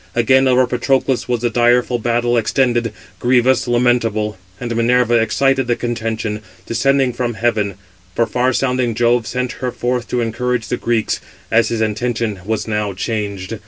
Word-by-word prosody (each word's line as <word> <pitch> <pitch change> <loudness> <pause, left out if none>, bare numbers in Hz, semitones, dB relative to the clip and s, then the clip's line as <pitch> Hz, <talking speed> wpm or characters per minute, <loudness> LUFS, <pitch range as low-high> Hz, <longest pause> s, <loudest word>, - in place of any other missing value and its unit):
Again 130 +3 +4
over 130 0 +4
Patroclus 130 +1 0
was 120 -2 -1
the 120 -1 0
direful 120 +1 +2
battle 120 +1 +1
extended, 120 0 +1 0.3
grievous, 125 +1 +2
lamentable; 120 -3 +1 0.2
and 120 -1 -4
Minerva 120 +1 +2
excited 135 +3 +1
the 120 - +2
contention, 110 -3 -3 0.2
descending 135 +1 +1
from 120 -1 -2
heaven; 110 -4 0 0.4
for 115 - +2
far 125 +3 +1
sounding 125 -2 0
Jove 120 0 +2
sent 125 0 -2
her 125 -1 -1
forth 120 -1 -2
to 125 - -1
encourage 115 +1 -2
the 125 - -1
Greeks, 115 -2 -1 0.3
as 115 +1 +4
his 115 -1 -2
intention 110 -1 -1
was 110 0 -2
now 105 -2 -1
changed. 100 0 -4
120 Hz, 155 wpm, -18 LUFS, 110-125 Hz, 0.4 s, Again